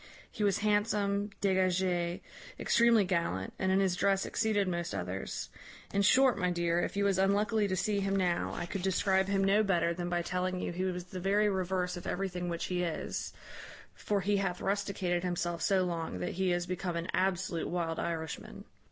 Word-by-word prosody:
He 215 - -3
was 200 -2 +3
handsome, 205 -1 +1
dégagé, 185 -2 +1 0.4
extremely 235 -3 +4
gallant, 170 - -1
and 190 0 +1
in 190 - +4
his 190 -2 +2
dress 195 +1 +2
exceeded 210 -3 +1
most 170 -1 -2
others. 90 +2 -4 0.4
In 200 - +2
short, 250 +3 +5
my 180 -1 +1
dear, 170 -1 +1
if 195 - -3
you 200 - +2
was 195 -2 +2
unluckily 205 +2 +2
to 190 - -1
see 205 +2 0
him 195 0 0
now, 180 -3 +1
I 175 - -3
could 185 +2 -4
describe 190 0 +2
him 195 -1 +1
no 200 +2 +4
better 175 -5 +2
than 175 0 -4
by 175 0 0
telling 180 +1 -1
you - - -3
he 180 +2 -2
was 180 -1 -2
the 185 +1 -8
very 205 +3 +2
reverse 185 -1 -1
of 175 - -7
everything 180 -2 -2
which 170 -1 -3
he 180 -1 -1
is: 170 -3 -3 0.6
for 205 -1 -1
he 205 +2 +1
hath 190 -2 -1
rusticated 195 -3 -1
himself 175 -1 -2
so 190 0 +3
long, 165 - -3
that 90 - -3
he 190 0 0
is 175 0 0
become 180 -1 -3
an 170 +1 -3
absolute 185 -2 0
wild 165 -2 -2
Irishman. 160 -2 -4
185 Hz, 190 wpm, -31 LUFS, 175-200 Hz, 0.6 s, short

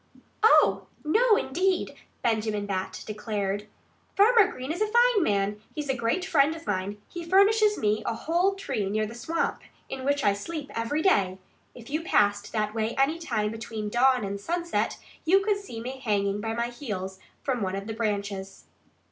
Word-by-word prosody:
"Oh! 445 - +5 0.2
no, 440 +8 +4
indeed!" 365 +7 0 0.3
Benjamin 215 -2 0
Bat 190 -2 -3
declared. 210 -1 -3 0.5
"Farmer 435 0 +6
Green 260 +3 -5
is 350 +5 -4
a 430 - +3
fine 475 -1 +4
man. 205 - 0
He's 300 -2 -4
a 265 - +2
great 235 +10 0
friend 305 -2 +3
of 330 - -11
mine. 200 +1 -2
He 345 - -7
furnishes 410 +4 +4
me 210 0 +1
a 230 - 0
whole 345 +10 +1
tree 240 - -2
near 215 +1 0
the 215 - -7
swamp, 270 +8 -2 0.3
in 265 -1 -5
which 285 +1 +1
I 205 -1 +4
sleep 290 +8 -6
every 230 +7 -1
day. 190 - +3 0.4
If 240 +1 -12
you 310 +2 0
passed 205 - +2
that 215 -1 -1
way 225 0 -1
any 285 +5 +2
time 220 -10 -1
between 225 -1 -5
dawn 250 +1 +3
and 200 0 -4
sunset 340 +7 -1 0.3
you 375 +4 +4
could 410 0 +1
see 390 - -8
me 255 +3 -6
hanging 205 -4 0
by 225 +1 -2
my 235 +1 -1
heels 195 -7 -5 0.2
from 255 -4 -1
one 190 -1 -1
of 195 0 -5
the 220 - -4
branches." 200 -3 -3
235 Hz, 180 wpm, -27 LUFS, 210-330 Hz, 0.5 s, Farmer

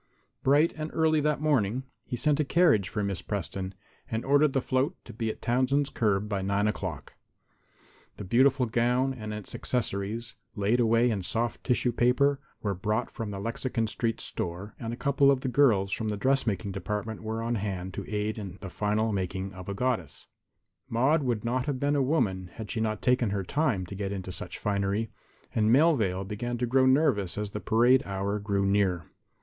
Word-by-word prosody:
Bright 145 +5 +4
and 155 0 -4
early 160 -1 +3
that 150 -1 0
morning 130 -5 +1 0.2
he - - -3
sent 150 +4 +2
a - - +4
carriage 145 - +3
for 105 - -2
Miss 100 -3 -2
Preston, 95 -1 -4 0.3
and 110 0 -2
ordered 145 +1 +4
the 135 - +3
float 130 +7 0
to - - -10
be 115 0 -2
at - - -6
Townsend's 130 +4 +1
curb 105 -2 +1
by 100 -2 -2
9 100 +2 +1
o'clock. 95 -8 -4 1.0
The - - -6
beautiful 130 +6 +3
gown 125 +3 +1
and 110 -4 -6
its 105 -2 -6
accessories, 115 0 -1 0.2
laid 105 +3 +1
away 115 +1 +4
in 100 -3 -1
soft 115 +6 -2
tissue 125 -1 +1
paper, 130 +4 +3 0.2
were 100 -2 0
brought 105 +5 -1
from 115 -2 -5
the 100 -1 -5
Lexington 115 +2 -2
street 110 +2 -2
store, 90 +4 -5
and 115 -1 -4
a - - -3
couple 140 0 +3
of 135 -2 +3
the 130 - -2
girls 115 -7 +3
from 110 - -2
the 105 - -2
dressmaking 110 -4 0
department 105 +3 -4
were 110 +1 -3
on 115 +1 -1
hand 95 -4 -3
to - - -6
aid 105 -3 -3
the 95 -3 -8
final 105 +2 0
making 95 0 -3
of 90 +1 -9
a 100 - -3
goddess. 125 +2 -2 0.6
Maude 135 +7 +3
would 120 -5 -1
not 125 +3 0
have 140 -3 -1
been 145 +2 +1
a 140 - +2
woman 95 - 0
had 110 -2 -6
she 115 - -2
not 110 -1 -2
taken 125 -3 +3
her 100 -1 -1
time 130 - 0
to 90 - -9
get 100 0 -3
into 95 -2 -5
such - - -6
finery, 100 +2 -1 0.4
and 110 -1 +2
Melvale 120 - +3
began 120 +4 -3
to 125 - 0
grow 130 +2 +3
nervous 130 - +2
as 105 -1 -3
the 105 - -4
parade 120 +5 +4
hour 100 +1 -2
grew 100 -1 0
near. 95 -4 +1
110 Hz, 190 wpm, -28 LUFS, 100-130 Hz, 1.0 s, Bright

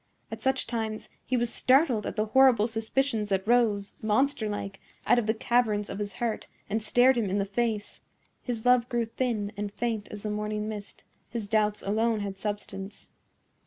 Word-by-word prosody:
At 225 0 -6
such 265 +2 +1
times 220 -2 -4 0.2
he 255 - +1
was 240 -1 0
startled 260 -5 +3
at - - -4
the 215 -1 +1
horrible 250 -2 +5
suspicions 225 0 -1
that 195 0 0
rose, 220 -4 +2
monster 220 +1 +1
like, 200 -1 -5 0.3
out 245 - +5
of 220 - -2
the 220 - +3
caverns 220 -3 +1
of 195 - -5
his 205 -1 -3
heart 230 -2 -3 0.2
and 220 +2 -1
stared 245 +4 +4
him 210 -4 0
in 195 - 0
the 200 - +1
face; 215 0 -2 0.4
his 235 -3 -4
love 250 -1 +4
grew 235 -1 0
thin 225 -3 -2
and 205 0 -4
faint 225 -1 -2
as 205 -1 -9
the 210 - -2
morning 210 0 -2
mist, 210 -2 -7 0.3
his 225 -3 -4
doubts 210 -1 +1
alone 220 +2 +1
had 195 -1 -5
substance. 205 -1 -6
220 Hz, 185 wpm, -28 LUFS, 210-240 Hz, 0.4 s, horrible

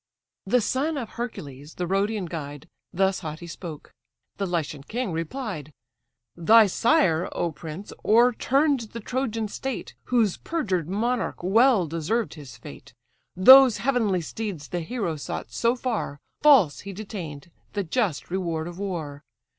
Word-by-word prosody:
The 250 +5 +3
son 285 +7 0
of 235 -5 -4
Hercules, 150 - -7
the 180 - -2
Rhodian 195 +2 0
guide, 145 -4 -7 0.2
Thus 190 +1 +1
haughty 160 0 -7
spoke. 170 -2 -9 0.4
The 195 - -1
Lycian 155 -5 -2
king 225 - -3
replied: 165 - -4 0.6
"Thy 220 +7 +6
sire, 195 - +2
O 170 - -1
prince! 160 +5 -8
o'erturn'd 250 +2 +3
the 230 - -5
Trojan 230 -2 -2
state, 265 +5 -5
Whose 230 -6 +2
perjured 185 - -2
monarch 230 +1 -1
well 220 +1 +4
deserved 165 +9 -2
his 135 -7 -11
fate; 70 -12 -12 0.4
Those 260 +5 +9
heavenly 230 -8 +1
steeds 185 -4 -5
the 175 - -2
hero 175 -3 -3
sought 145 - -6
so 235 +1 +1
far, 235 - -3 0.2
False 265 - +6
he 200 -1 -8
detain'd, 175 -7 -7 0.2
the 205 - -1
just 180 - -1
reward 170 -4 -2
of 175 +1 -8
war. 160 -8 -4
195 Hz, 140 wpm, -25 LUFS, 165-235 Hz, 0.6 s, Those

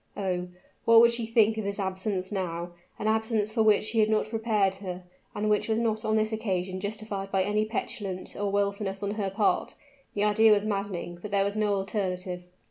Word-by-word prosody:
Oh! 180 -2 -1 0.4
what 230 0 +7
would 235 +1 +7
she 235 -1 -3
think 220 -1 +3
of - - -2
his 200 0 -2
absence 190 0 -2
now? 175 -3 -3 0.3
an 215 - -2
absence 220 -1 +1
for 225 0 +1
which 215 0 +3
he 225 - +1
had 215 0 +4
not 215 0 +1
prepared 220 -4 +1
her, 185 -2 -6 0.3
and 210 +1 -1
which 210 +1 +1
was 220 - +2
not 220 -1 0
on 215 -1 +1
this 215 0 +1
occasion 185 -4 -2
justified 205 -1 -4
by 190 -1 +2
any 210 +2 +1
petulance 200 -4 -4
or 205 -1 -1
willfulness 200 0 -1
on 200 - -1
her 205 -2 -2
part? 200 +2 +1 0.4
The 205 - +1
idea 215 +1 +5
was 205 0 +1
maddening, 195 -4 -3
but 210 - -6
there 200 0 +2
was 200 +1 -2
no 210 -1 +1
alternative. 185 -2 -3
205 Hz, 205 wpm, -28 LUFS, 195-220 Hz, 0.4 s, what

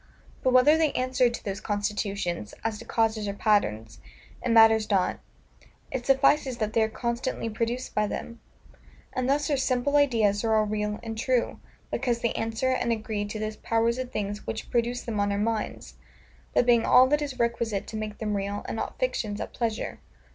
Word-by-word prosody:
But 255 - +2
whether 275 +5 +6
they 315 -3 +3
answer 255 -1 +2
to 235 - -7
those 200 +1 -4
constitutions, 200 - -2
as 220 -2 -2
to 235 - -10
causes 225 -2 0
or 200 - -3
patterns, 115 - 0 0.4
it 250 - -1
matters 225 -1 +6
not; 195 -3 +1 0.7
it 250 -2 -4
suffices 270 -1 +3
that 215 -1 -2
they 225 - +3
are 220 - +2
constantly 235 0 -3
produced 235 +3 -3
by 210 0 +1
them. 230 +3 -6 0.7
And 255 0 -1
thus 285 +1 +2
our 285 - +2
simple 265 +2 +1
ideas 225 -8 +3
are 220 -1 +2
all 215 0 +3
real 210 0 -2
and 225 -1 -5
true, 245 +2 0 0.3
because 240 -3 -1
they 235 - 0
answer 225 +3 -1
and 240 -2 0
agree 215 -2 -2
to 205 +1 -5
those 215 0 -4
powers 230 +2 0
of 255 -1 -4
things 205 0 -4
which 220 - -5
produce 240 +1 0
them 220 -3 -3
on 205 0 +1
our 200 - 0
minds; 220 +1 -3 0.6
that - - +4
being 235 -2 +4
all 255 - +7
that 295 +1 +2
is 280 -3 -4
requisite 235 -4 -1
to - - -8
make 215 -1 -4
them 210 -2 -2
real, 200 +1 -3
and - - -4
not - - -4
fictions 215 - -2
at - - -5
pleasure. 230 -2 -3
225 Hz, 190 wpm, -27 LUFS, 210-250 Hz, 0.7 s, all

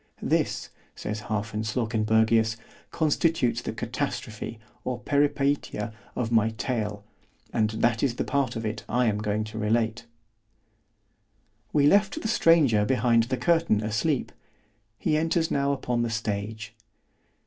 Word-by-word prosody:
This, - - 0 0.3
says 105 0 -5
Hafen 105 0 -2
Slawkenbergius, 110 0 +2 0.3
constitutes 155 -6 +1
the - - -4
Catastrophe 115 -1 -4 0.3
or 125 -1 -2
Peripeitia 140 -3 0 0.2
of 120 -2 -2
my 110 -1 +4
tale—and 110 -1 -4
that 115 +1 +1
is 130 -4 +1
the - - -1
part 140 -4 0
of 115 -1 -4
it 110 +1 -3
I 125 +1 +2
am 105 -2 +1
going 105 0 -1
to 110 +1 -7
relate. 110 +1 0 1.6
We 145 -2 +3
left 200 - +4
the 220 - -3
stranger 160 - +4
behind 115 0 +3
the 130 +2 -2
curtain 165 -11 +2
asleep——he 125 +5 -3
enters 165 +1 +1
now 140 0 +1
upon 125 -3 -1
the 120 - 0
stage. 110 -1 -3
115 Hz, 125 wpm, -26 LUFS, 110-140 Hz, 1.6 s, my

